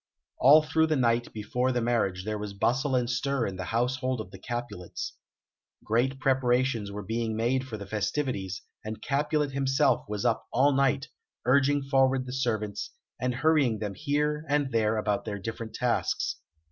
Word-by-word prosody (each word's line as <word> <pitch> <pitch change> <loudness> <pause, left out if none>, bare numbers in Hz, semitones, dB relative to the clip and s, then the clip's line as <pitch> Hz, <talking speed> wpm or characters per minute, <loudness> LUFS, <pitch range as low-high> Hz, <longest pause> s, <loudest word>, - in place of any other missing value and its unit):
All 150 +4 +7
through 160 +1 +2
the 155 - +1
night 120 -2 +1
before 125 +4 -1
the 125 - 0
marriage 110 -6 0
there 105 -1 -2
was 105 -1 -6
bustle 130 +6 +1
and 125 -1 +1
stir 130 +1 0
in 95 -1 -4
the 95 - -4
household 125 +3 0
of 95 -4 -7
the 95 - -11
Capulets. 120 -8 -5 0.7
Great 125 +5 +1
preparations 125 -5 +1
were 105 +1 -5
being 110 +2 -2
made 125 +4 +1
for 110 -4 -5
the 100 - -7
festivities, 105 -2 -2 0.2
and 110 0 -5
Capulet 150 +1 0
himself 135 -1 +2
was 105 -1 -3
up 115 -1 +1
all 140 +4 +4
night, 140 +2 +1 0.4
urging 140 +2 +3
forward 135 -1 +2
the 125 - -6
servants, 110 -6 -2 0.3
and 125 -1 0
hurrying 140 -4 +3
them 105 -1 -4
here 150 +5 0
and 145 -2 +1
there 110 -1 +2
about 105 -1 0
their 105 -2 -3
different 110 +2 -6
tasks. 125 -2 0
125 Hz, 170 wpm, -28 LUFS, 110-135 Hz, 0.7 s, All